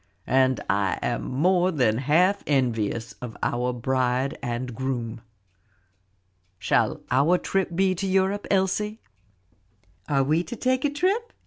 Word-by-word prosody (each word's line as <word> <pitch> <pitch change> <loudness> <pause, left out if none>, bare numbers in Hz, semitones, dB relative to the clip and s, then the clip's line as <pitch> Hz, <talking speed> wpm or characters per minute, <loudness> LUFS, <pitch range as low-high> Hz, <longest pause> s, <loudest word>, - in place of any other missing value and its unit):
And 130 0 +2
I 100 -3 +1
am - - -1
more 180 +7 +2
than 125 -9 +1
half 170 +9 +3
envious 120 -3 0
of 120 -3 -7
our 125 +1 0
bride 130 +2 0
and 125 -1 -3
groom. 120 -2 -4 1.4
Shall - - +1
our 170 +6 +4
trip 190 -2 -2
be 190 +1 +2
to 195 +2 -3
Europe, 190 +2 +1
Elsie?" 205 +3 0 1.1
"Are 140 -2 +3
we 155 +5 +1
to 240 - -6
take 255 +1 0
a - - +3
trip?" 385 +11 -1
140 Hz, 130 wpm, -25 LUFS, 125-190 Hz, 1.4 s, our